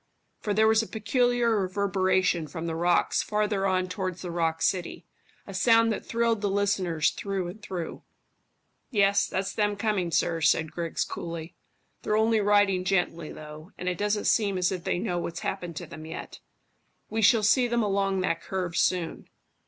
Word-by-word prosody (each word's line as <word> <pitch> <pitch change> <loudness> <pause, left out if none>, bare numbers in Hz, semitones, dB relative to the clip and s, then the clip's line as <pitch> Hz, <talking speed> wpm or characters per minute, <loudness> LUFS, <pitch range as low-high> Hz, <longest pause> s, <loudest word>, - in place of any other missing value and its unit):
For 210 - -3
there 220 +2 +4
was 220 0 +4
a 225 - -6
peculiar 235 +1 +1
reverberation 185 -3 +1
from 160 +2 -6
the 165 - -2
rocks 170 +2 +2
farther 210 -2 0
on 185 -1 +1
towards 185 -1 -4
the 175 - -4
rock 165 -1 -1
city 175 -2 -1 0.4
a 195 - -9
sound 230 +3 +4
that 215 - -3
thrilled 230 -2 0
the 205 - 0
listeners 195 -5 +1
through 195 -3 -3
and 210 +5 -10
through. 180 -5 -5 0.9
"Yes, 200 -3 +3
that's 195 +1 -2
them 205 -1 +1
coming, 200 -4 0
sir," 165 0 0
said 160 +1 +2
Griggs 170 -1 -2
coolly. 165 -1 -6 0.5
"They're 210 - 0
only 220 0 +3
riding 205 -2 +3
gently, 175 -4 -1
though, 155 +2 -11
and 180 - -6
it 180 -1 -1
doesn't 205 0 0
seem 200 -4 +2
as 180 0 +1
if 180 -2 -5
they - - 0
know 180 -2 -2
what's 170 -1 -5
happened 175 -4 -4
to 175 - -5
them 155 0 -10
yet. 160 - -8 0.7
We 220 +1 0
shall 220 +1 +5
see 245 +4 +4
them 235 -1 +1
along 195 -2 0
that 165 -3 -1
curve 180 -3 -3
soon. 175 -3 0
190 Hz, 175 wpm, -27 LUFS, 175-210 Hz, 0.9 s, shall